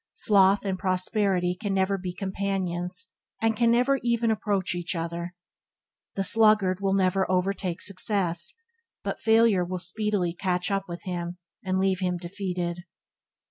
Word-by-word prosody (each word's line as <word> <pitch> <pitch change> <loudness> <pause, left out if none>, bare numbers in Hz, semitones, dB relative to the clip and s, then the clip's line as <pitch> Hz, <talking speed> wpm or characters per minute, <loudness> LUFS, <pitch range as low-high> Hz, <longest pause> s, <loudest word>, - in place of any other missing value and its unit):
Sloth 200 -1 +4
and 190 -1 -2
prosperity 185 -1 +1
can 200 +1 -3
never 190 +1 +2
be 185 -1 -4
companions 185 -1 -3 0.3
can 225 +1 +2
never 250 +4 +3
even 235 -1 +1
approach 205 -4 0
each 175 +1 -3
other. 170 +1 -4 0.8
The 195 - 0
sluggard 215 -3 +4
will 195 0 +1
never 190 0 +1
overtake 185 -1 -1
success, 185 -4 0 0.5
but - - -4
failure 225 -4 +4
will 185 +1 -4
speedily 180 0 0
catch 180 +1 -1
up 195 0 0
with 170 -1 -7
him, 175 -1 -4 0.3
and 185 0 0
leave 190 -1 +1
him 180 -2 -1
defeated. 175 -1 -4
190 Hz, 140 wpm, -26 LUFS, 180-205 Hz, 0.8 s, Sloth